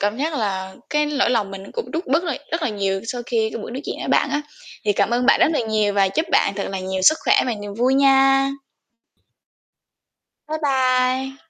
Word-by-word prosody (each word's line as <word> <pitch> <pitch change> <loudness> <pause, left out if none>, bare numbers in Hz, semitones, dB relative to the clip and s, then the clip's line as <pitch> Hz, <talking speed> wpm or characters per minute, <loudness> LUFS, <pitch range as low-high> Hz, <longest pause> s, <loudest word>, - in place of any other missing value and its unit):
cảm 205 +2 0
giác 310 +2 -1
là 190 -5 -3 0.2
cái 300 0 +1
lỗi 280 -5 +1
lòng 215 -5 0
mình 195 0 -9
cũng 470 - -5
rút 330 +3 -4
bớt 315 +6 +2
rồi 310 -7 -3
rất 330 -1 -1
là - - +1
nhiều 195 -2 -2
sau 245 +1 -4
khi 220 -2 0
cái - - -5
buổi - - -7
nói 260 +3 -5
chuyện - - -4
với - - -5
bạn 285 - +2
á. 295 +1 0 0.4
Thì 205 - +2
cảm 220 - +1
ơn 245 +1 +1
bạn - - +5
rất - - +5
là 300 - +1
nhiều 215 -2 +1
và 195 -1 +3
chúc 315 - -1
bạn 200 - +3
thật 200 - -3
là 195 - -3
nhiều 190 0 -3
sức 315 +10 +5
khỏe - - +4
và 240 - -1
niềm 205 -1 -7
vui 250 +4 +2
nha. 270 0 +4 2.0
Bye 315 0 -3
bye. 260 -1 +1
255 Hz, 230 wpm, -21 LUFS, 205-275 Hz, 2.0 s, bạn